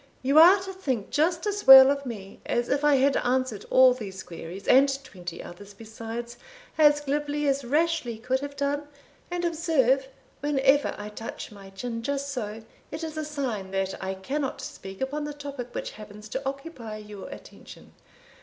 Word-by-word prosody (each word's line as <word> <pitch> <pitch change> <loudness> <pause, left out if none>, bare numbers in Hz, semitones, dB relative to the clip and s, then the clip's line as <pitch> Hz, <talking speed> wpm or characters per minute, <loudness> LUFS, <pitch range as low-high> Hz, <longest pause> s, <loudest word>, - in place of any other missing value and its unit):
You 280 +4 +5
are 360 +5 +8
to 385 0 -6
think 265 - -3
just 335 +4 +1
as 415 0 -3
well 265 0 +11
of 280 -1 -3
me 200 -5 -8
as 240 0 0
if 280 +1 0
I 295 -1 +5
had 270 +1 +3
answered 255 -4 -1
all 255 -1 +7
these 195 -6 -7
queries, 170 +3 -9
and 270 +2 +6
twenty 175 -7 -8
others 200 +3 -12
besides, 230 +2 -7 0.4
as 295 -1 +5
glibly 295 +1 -1
as 275 0 +1
Rashleigh 300 -3 0
could 250 +4 -1
have 285 0 -7
done; 285 +1 -2 0.4
and 350 0 -2
observe, 295 -6 +2 0.3
whenever 285 -1 +2
I 210 0 -6
touch 225 +2 -7
my 200 -2 -12
chin 230 +4 -5
just 280 +3 -2
so, 225 -4 -5 0.3
it 310 +2 -6
is 320 -1 -5
a 310 - -3
sign 260 -10 -4
that 195 0 -1
I 190 0 -3
cannot 270 +9 -3
speak 190 +2 -9
upon 290 +3 -2
the 295 -1 -6
topic 280 -4 -7
which - - -4
happens 210 0 -11
to 265 - -3
occupy 275 -6 -8
your 210 -2 -9
attention. - - -13
265 Hz, 175 wpm, -26 LUFS, 215-290 Hz, 0.4 s, well